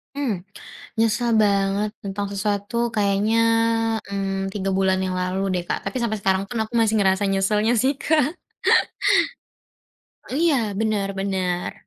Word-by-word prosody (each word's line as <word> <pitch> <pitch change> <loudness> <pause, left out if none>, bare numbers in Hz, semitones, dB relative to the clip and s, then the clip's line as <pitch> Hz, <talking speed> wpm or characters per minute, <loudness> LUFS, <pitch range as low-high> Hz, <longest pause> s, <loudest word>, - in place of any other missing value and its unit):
Mmm, 220 -11 -2 0.5
nyesel 230 +2 +1
banget 200 0 +1
tentang 200 +1 -3
sesuatu 205 +2 -2 0.2
kayaknya, 205 +2 +2 0.7
mmm, 195 -1 -2
3 195 -2 -2
bulan 190 -1 +2
yang 185 -1 -2
lalu 185 +1 -1
deh, 175 -1 -1
Kak. - - 0
Tapi 260 - -3
sampai 220 -2 -1
sekarang 190 0 +1
pun 245 - -4
aku 220 +2 -5
masih 220 -1 +2
ngerasa 190 0 +2
nyeselnya 210 +3 +1
sih, 270 +2 +2
Kak. 305 +1 +1 2.0
Iya, 315 +3 +2 0.2
bener 215 -3 0
bener. 185 -2 -2
200 Hz, 130 wpm, -23 LUFS, 195-225 Hz, 2.0 s, kayaknya